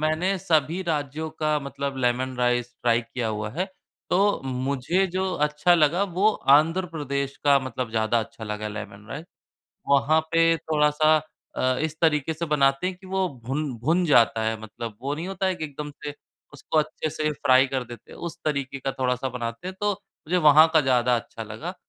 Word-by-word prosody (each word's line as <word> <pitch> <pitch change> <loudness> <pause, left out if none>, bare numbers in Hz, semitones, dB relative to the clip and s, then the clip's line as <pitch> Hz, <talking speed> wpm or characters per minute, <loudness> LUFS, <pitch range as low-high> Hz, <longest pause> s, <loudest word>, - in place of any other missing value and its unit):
मैंने 160 +5 +1
सभी 165 -2 +1
राज्यों 155 -2 -2
का 155 -1 +2
मतलब 140 0 -4
लेमन 130 +2 0
राइस 125 0 0
ट्राई 120 -1 +3
किया 115 0 -4
हुआ 105 0 -3
है, 180 - -2 0.4
तो 200 +3 +3
मुझे 135 +8 0
जो 185 +1 -2
अच्छा 150 +4 +3
लगा, 165 +3 +3
वो 190 +2 +2 0.2
आंध्र 165 +6 +4
प्रदेश 140 -2 -3
का 140 -1 +6
मतलब 125 -2 -4
ज़्यादा 110 +1 +1
अच्छा 110 +1 -8
लगा 105 0 -4
लेमन 105 0 -8
राइस। 150 +4 -6 0.6
वहाँ 140 +3 +4
पे 165 0 +4
थोड़ा-सा 155 0 +3 0.4
अ, 130 0 +1
इस 155 0 -2
तरीके 155 -2 +2
से 160 +2 -4
बनाते 140 +1 +2
हैं 185 0 -3
कि 185 +1 -15
वो 190 0 0 0.2
भुन 140 +3 -2
भुन 170 +5 +3
जाता 115 -5 +4
है, 110 0 -1
मतलब 110 0 -7
वो 140 +2 -1
नहीं 160 +4 -5
होता 195 0 -2
है 190 - +1
कि 160 - -5
एकदम 150 0 -6
से 145 -1 -4 0.4
उसको 145 +2 -2
अच्छे 155 +1 -1
से 155 0 -1
फ्राई 130 -2 +4
कर 130 -1 -2
देते 120 -1 -12
हैं, - - -12
उस 170 0 -6
तरीके 140 -3 -2
का 135 - -2
थोड़ा-सा 130 0 0
बनाते 120 +4 -5
हैं, 190 - -6
तो 205 0 +2
मुझे 190 -3 -5
वहाँ 155 -2 +7
का 160 - +7
ज़्यादा 125 -3 +2
अच्छा 115 0 -7
लगा। 110 - -6
145 Hz, 190 wpm, -25 LUFS, 125-165 Hz, 0.6 s, वहाँ